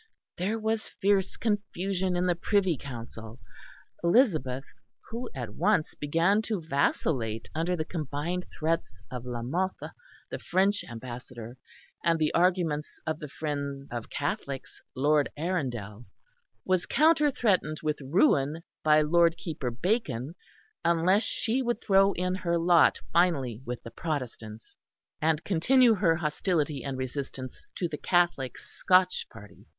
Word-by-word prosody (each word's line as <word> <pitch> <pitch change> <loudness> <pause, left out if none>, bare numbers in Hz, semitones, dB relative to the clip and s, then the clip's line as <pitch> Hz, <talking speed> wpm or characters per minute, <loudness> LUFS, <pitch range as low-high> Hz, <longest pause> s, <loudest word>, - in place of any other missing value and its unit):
There 200 +5 -1
was 220 0 -1
fierce 195 -1 +1
confusion 195 -3 -1
in 175 +1 +1
the 180 - +3
Privy 185 0 +1
Council. 115 -3 -9 0.6
Elizabeth, 165 - +3 0.5
who 235 +2 -4
at 120 -5 -5
once 180 - +1
began 165 +8 +2
to 220 -2 -2
vacillate 140 -7 -1
under 165 +3 0
the 155 -2 -2
combined 160 +3 -3
threats 160 -9 -1
of 125 -1 -6
La 120 -1 -4
Mothe, 180 +9 -2 0.4
the - - -4
French 195 +2 +1
ambassador, 120 0 -8 0.5
and 165 -1 +3
the 155 -1 +1
arguments 170 -4 +1
of 155 -1 -2
the 150 - -6
friend 140 -2 -4
of 120 -2 -5
Catholics, 140 -1 -4
Lord 145 +2 +3
Arundel, 125 - -3 0.6
was 185 -1 +1
counter 305 -1 +4
threatened 185 - +1
with 150 -1 -1
ruin 150 - +2 0.2
by 155 0 +5
Lord 170 +2 +4
Keeper 155 -7 -4
Bacon 140 - -1 0.5
unless 180 +6 +3
she 235 +4 0
would 240 -3 -1
throw 195 -2 +4
in 180 +1 -1
her 175 -2 0
lot 170 0 +5
finally 140 -10 +2
with 125 0 -4
the 115 - -9
Protestants 120 -8 -5 0.5
and 155 0 +1
continue 235 +7 +4
her 180 -5 +3
hostility 150 -3 -1
and 135 0 -4
resistance 130 0 -6
to 175 - -1
the 150 -3 -6
Catholic 175 -7 +1
Scotch 185 0 +2
party. 105 0 -14
160 Hz, 135 wpm, -28 LUFS, 135-185 Hz, 0.6 s, by